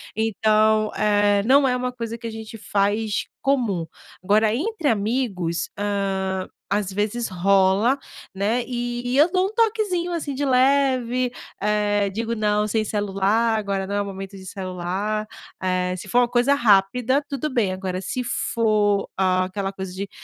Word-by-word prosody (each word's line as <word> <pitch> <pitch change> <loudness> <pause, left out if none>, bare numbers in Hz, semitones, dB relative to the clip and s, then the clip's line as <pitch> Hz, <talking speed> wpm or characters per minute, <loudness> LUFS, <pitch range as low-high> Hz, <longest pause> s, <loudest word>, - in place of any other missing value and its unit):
Então, 215 0 +2
eh, 205 -1 +3
não 270 +2 +5
é 250 - +1
uma 250 0 -2
coisa 230 -2 -5
que 235 - -12
a 225 - -5
gente 220 0 -8
faz 205 +1 0 0.2
comum. 235 -12 0 0.4
Agora 215 +3 +3
entre 340 - -2
amigos, 205 -6 -1
hã, 195 -2 -1 0.2
às 200 -1 0
vezes 210 +4 -1
rola, 195 +5 +3 0.4
né, 215 +5 0
e 240 -1 -3
e 250 +2 0
eu 315 +4 +5
dou 370 0 +2
um 420 - -8
toquezinho, 425 -6 +1
assim, 315 -4 -3
de 275 +2 -3
leve, 255 -2 +2 0.3
eh, 205 -1 +1
digo: 230 +3 -2
"Não, 210 0 +1
sem 220 +1 0
celular, 205 +2 +1
agora 195 -2 -2
não 200 - -4
é 205 - +1
o - - -3
momento 195 0 -7
de 190 - -11
celular", 190 +3 -3 0.3
eh, 185 -1 0
se - - -9
for 245 - +3
uma 245 - +3
coisa 245 +4 +3
rápida, 240 +4 +3
tudo 280 +2 -2
bem, 220 -7 +1
agora 185 -1 -4
se 250 +6 -3
for 215 -4 +1
aquela 185 +1 0
coisa 190 -1 -6
de, 195 +1 -5
215 Hz, 160 wpm, -23 LUFS, 195-245 Hz, 0.4 s, não